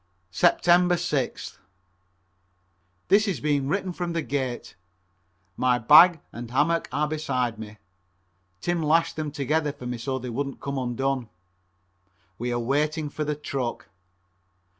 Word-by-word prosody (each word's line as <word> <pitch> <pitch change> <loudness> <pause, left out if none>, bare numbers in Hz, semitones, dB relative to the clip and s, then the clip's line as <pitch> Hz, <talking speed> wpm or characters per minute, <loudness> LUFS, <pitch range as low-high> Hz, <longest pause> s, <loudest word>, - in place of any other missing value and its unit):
Sept. - - +3
6th. 175 -6 +1 1.5
This 210 +2 +4
is 185 -9 -1
being 140 0 0
written 185 +3 -1
from 175 -1 -3
the 165 -1 -1
gate. 130 -1 -3 0.8
My 125 -1 +2
bag 155 +8 +7
and 120 0 -7
hammock 150 +7 +1
are 150 - 0
beside 130 -7 -2
me. 110 -1 -9 0.8
Tim 175 -1 -1
lashed 160 +2 +2
them 155 -1 -3
together 150 +2 0
for 140 -3 -11
me 125 -1 -4
so 130 +3 -2
they 125 -1 -6
wouldn't 140 +3 -4
come 140 -1 -3
undone. 130 0 -2 1.1
We 120 +1 -2
are 120 - 0
waiting 150 +5 0
for 150 - -4
the 150 0 -2
truck. 135 -4 -4
145 Hz, 135 wpm, -25 LUFS, 125-160 Hz, 1.5 s, bag